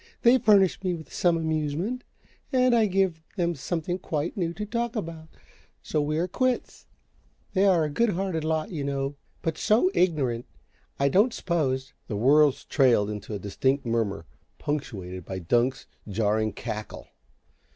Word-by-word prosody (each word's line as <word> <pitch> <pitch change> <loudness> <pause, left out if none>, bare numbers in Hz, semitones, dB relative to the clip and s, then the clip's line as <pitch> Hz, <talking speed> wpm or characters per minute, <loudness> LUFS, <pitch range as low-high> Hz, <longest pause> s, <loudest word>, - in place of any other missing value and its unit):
They 250 +1 +6
furnish 200 -5 +4
me 180 -2 0
with 160 -2 -11
some 175 -2 +2
amusement, 160 +9 -2 0.5
and 255 -2 +4
I 225 -2 +4
give 190 -4 +1 0.2
them 175 -1 +1
something 170 +4 -3
quite 155 -2 -3
new 170 -4 -1
to 210 +5 -5
talk 235 +2 -2
about, 165 -6 -5 0.6
so 150 - 0
we 150 +1 -1
are 170 +3 +1
quits. 255 +6 -1 0.7
They 195 0 +3
are 175 -4 +4
a 150 - -1
good 235 +9 +2
hearted 185 -4 -1
lot, 160 0 -1
you 155 -5 -3
know 140 0 -2 0.3
but 165 -1 -2
SO 235 - +3
ignorant! 135 -10 +1 0.5
I 140 - +3
don't 205 - +3
suppose 135 -7 -1
" - - -44
The 105 - -3
words 140 +5 +4
trailed 120 -7 +3
into 105 +1 -6
an - - -1
indistinct 130 +8 0
murmur, 110 -7 -1 0.3
punctuated 95 - -4
by 95 +3 -5
Dunk's 120 +9 +1 0.2
jarring 110 +1 0
cackle. 110 -1 -6
155 Hz, 160 wpm, -26 LUFS, 125-190 Hz, 0.7 s, They